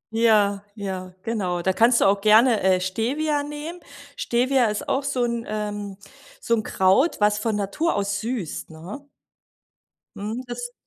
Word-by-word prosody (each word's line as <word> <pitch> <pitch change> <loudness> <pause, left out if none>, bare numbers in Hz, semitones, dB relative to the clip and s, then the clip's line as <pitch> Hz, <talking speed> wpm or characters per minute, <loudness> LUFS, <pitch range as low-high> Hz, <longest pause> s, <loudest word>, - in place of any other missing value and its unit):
Ja, 210 -3 +3
ja, 185 -3 -6
genau. 185 -6 -2
Da 190 - +2
kannst 235 +4 +4
du - - +3
auch 200 0 +3
gerne, 220 +2 +5
äh, 185 -1 +3
Stevia 265 +11 -1
nehmen. 295 +4 -7 0.4
Stevia 250 +1 +1
ist 210 -1 -2
auch 270 - +1
so 265 -3 -1
'n 235 -1 -1
ähm, 205 -2 -4 0.4
so 235 - -1
'n 225 - +2
Kraut, 205 - +2
was 210 0 +3
von 220 0 -1
Natur 205 +12 -1
aus 200 0 -1
süßt 225 -8 -4
ne? 170 - -9 1.1
Mhm. 220 +5 -4
Das 245 0 -6
215 Hz, 155 wpm, -23 LUFS, 200-245 Hz, 1.1 s, gerne